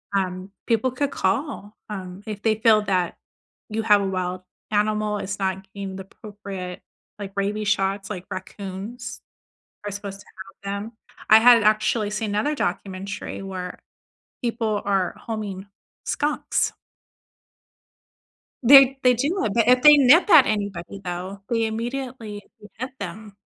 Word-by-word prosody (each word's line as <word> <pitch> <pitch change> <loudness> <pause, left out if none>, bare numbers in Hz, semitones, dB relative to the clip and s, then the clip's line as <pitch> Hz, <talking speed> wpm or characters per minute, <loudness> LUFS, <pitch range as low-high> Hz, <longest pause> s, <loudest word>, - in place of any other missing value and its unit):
um, 185 0 -2 0.2
people 230 +2 +2
could 280 +2 -1
call, 210 +1 -2
um, 190 -1 -7
if 210 -1 -5
they 220 -1 +3
feel 215 -1 +4
that 185 -4 0 0.5
you 220 +1 -2
have 210 -2 +5
a 195 - -1
wild 185 -1 -2 0.3
animal, 210 0 +1
it's 200 +1 -4
not 190 0 -1
getting 195 -1 -6
the 190 - -6
appropriate, 195 -3 -8 0.4
like 195 -1 -6
rabies 205 +1 -1
shots, 195 -1 0
like 185 -3 -5
raccoons 200 +5 -7 0.6
are 205 - -3
supposed 200 0 -7
to - - -18 0.4
have 200 - -2
them. 225 - -9 0.4
I 220 - +9
had 235 -1 +7
actually 215 0 +2
seen 210 0 -2
another 220 +9 0
documentary 195 -2 -4
where 185 -2 -6 0.6
people 225 -3 -1
are 195 -3 0
homing 205 -3 -5 0.4
skunks. 295 +1 0 1.9
They 270 +1 +8
they 250 -1 +6
do 290 +11 0
it, 205 - -1
but 230 -1 +2
if 250 0 +5
they 295 -1 +10
nip 285 - +6
at 310 -7 +8
anybody, 200 -2 -3
though, 185 +2 -5
they 230 -2 +1
immediately 230 -1 -4 0.2
could 210 - -14
hit 255 +4 -5
them. 200 +2 -7
210 Hz, 145 wpm, -23 LUFS, 195-230 Hz, 1.9 s, they